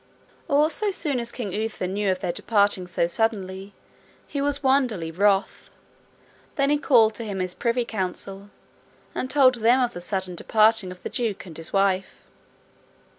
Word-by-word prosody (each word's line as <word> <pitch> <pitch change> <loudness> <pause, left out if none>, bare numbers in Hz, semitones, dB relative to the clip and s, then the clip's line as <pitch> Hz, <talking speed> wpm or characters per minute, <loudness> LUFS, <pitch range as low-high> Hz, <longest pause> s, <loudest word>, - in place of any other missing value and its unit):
All 295 +3 +3
so 425 +3 -1
soon 300 -9 0
as 235 0 -4
King 210 -7 -5
Uther 215 -2 -3
knew 200 +2 -1
of 185 - -3
their 180 - -1
departing 200 -2 +1
so 175 -1 0
suddenly, 195 -1 -2 0.5
he 285 - -4
was 285 0 -1
wonderly 250 -11 +1
wroth. 195 +3 +1 0.9
Then 275 0 +2
he 295 - +2
called 230 -6 +4
to 230 - -6
him 200 -3 -4
his 185 -1 0
privy 235 +1 -1
council, 195 -1 -4 0.6
and 255 - -3
told 260 -2 +5
them 240 +2 +3
of 245 -2 0
the 175 - -7
sudden 190 0 -2
departing 215 +2 +2
of 180 0 -11
the - - -4
duke 225 -6 -3
and 170 -4 -11
his 165 0 -3
wife. 195 -1 0
215 Hz, 170 wpm, -24 LUFS, 190-250 Hz, 0.9 s, told